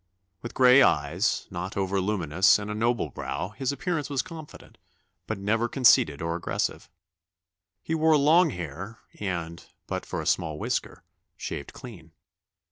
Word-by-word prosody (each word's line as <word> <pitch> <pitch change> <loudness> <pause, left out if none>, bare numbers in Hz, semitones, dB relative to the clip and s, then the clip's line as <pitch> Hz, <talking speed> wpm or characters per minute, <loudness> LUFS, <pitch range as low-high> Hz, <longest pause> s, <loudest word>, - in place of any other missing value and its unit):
With 120 - -8
gray 130 +1 +7
eyes 80 - +2
not 90 +2 -5
over 95 0 0
luminous 95 -3 +3
and 105 0 -5
a - - -2
noble 115 +3 0
brow, 90 - -4
his 130 +5 -3
appearance 150 0 -3
was 140 -2 -1
confident, 160 -3 -12 0.5
but 110 - -3
never 110 +4 0
conceited 100 - +4
or 85 0 -1
aggressive. 85 - -3 0.9
He 160 - -3
wore 160 -1 +4
long 160 +4 +5
hair, 95 - -7 0.2
and, 85 -4 -4 0.2
but - - -4
for - - -4
a - - -4
small 80 -3 0
whisker, - - -3 0.3
shaved - - -6
clean. 85 -10 -12
105 Hz, 145 wpm, -26 LUFS, 85-130 Hz, 0.9 s, gray